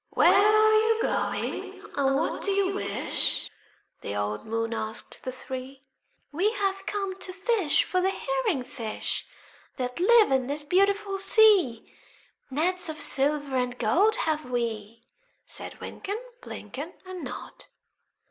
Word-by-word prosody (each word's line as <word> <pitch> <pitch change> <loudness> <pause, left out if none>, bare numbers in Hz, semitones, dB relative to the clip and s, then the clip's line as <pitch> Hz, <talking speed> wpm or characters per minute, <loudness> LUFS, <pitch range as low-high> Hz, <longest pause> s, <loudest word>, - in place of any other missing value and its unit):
"Where - - +5
are 430 +2 +5
you 445 +1 +3
going, - - -2 0.2
and 270 -1 +2
what 300 - -1
do - - 0
you 395 -1 +1
wish?" 400 - 0 0.5
The 100 - -5
old 105 - -3
moon 225 +1 -2
asked 220 -1 -6
the 255 - -4
three. 260 +1 -8 0.5
"We 355 +8 +2
have 390 -2 -2
come 390 -2 -3
to 370 - -4
fish 385 -3 +2
for 365 - 0
the 380 - +2
herring 440 - -1
fish 235 -5 -4 0.5
That 250 +1 -4
live 435 0 +5
in 260 -2 +2
this 290 +2 -2
beautiful 395 +4 +1
sea; 390 - +4 0.6
Nets 350 +6 +1
of 315 - -6
silver 285 0 +2
and 250 -1 -1
gold 360 - +3
have 310 -1 0
we," 230 -3 -3 0.4
Said - - -6
Wynken, 405 +2 -5 0.2
Blynken, 280 - -8
And 370 -1 -7
Nod. - - -8
315 Hz, 140 wpm, -27 LUFS, 250-395 Hz, 0.6 s, Where